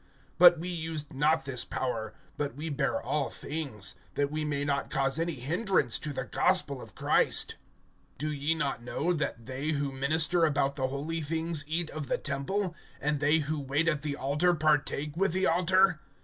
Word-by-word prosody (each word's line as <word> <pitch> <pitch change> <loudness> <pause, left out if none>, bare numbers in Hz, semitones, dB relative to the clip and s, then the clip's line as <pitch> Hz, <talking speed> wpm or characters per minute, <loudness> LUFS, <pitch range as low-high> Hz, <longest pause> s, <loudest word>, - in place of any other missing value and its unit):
But 175 -1 +9
we 170 +3 -5
used 160 -3 -3
not 150 +2 +2
this 130 -3 +1
power; 115 -4 -3 0.2
but 145 -4 -3
we 155 +3 -4
bear 120 -5 0
all 140 +3 -1
things, 135 - -4 0.2
that 145 0 0
we 155 0 -1
may 145 -1 -1
not 140 -1 -1
cause 135 +1 +1
any 165 -1 -1
hindrance 155 - +1
to 150 - -3
the 130 -2 -3
gospel 120 - +1
of - - -12
Christ. - - +2 0.6
(13)Do 150 +1 -3
ye 155 +3 +2
not 140 -6 -1
know 155 +8 -1
that 140 -7 -3
they 135 +4 -2
who 140 -1 -1
minister 155 +6 +2
about 140 -3 +2
the 130 -2 0
holy 150 +5 -3
things 160 +1 -2
eat 165 +1 -2
of 155 -3 -5
the - - 0
temple, 170 +7 -2 0.3
and 150 0 0
they 150 +3 +3
who 155 +1 -2
wait 140 +4 0
at 150 -3 +1
the 145 -1 -3
altar 150 +6 +2
partake 150 -1 +1
with 190 0 +1
the 190 +1 +1
altar? 185 -1 +3
150 Hz, 185 wpm, -29 LUFS, 140-165 Hz, 0.6 s, But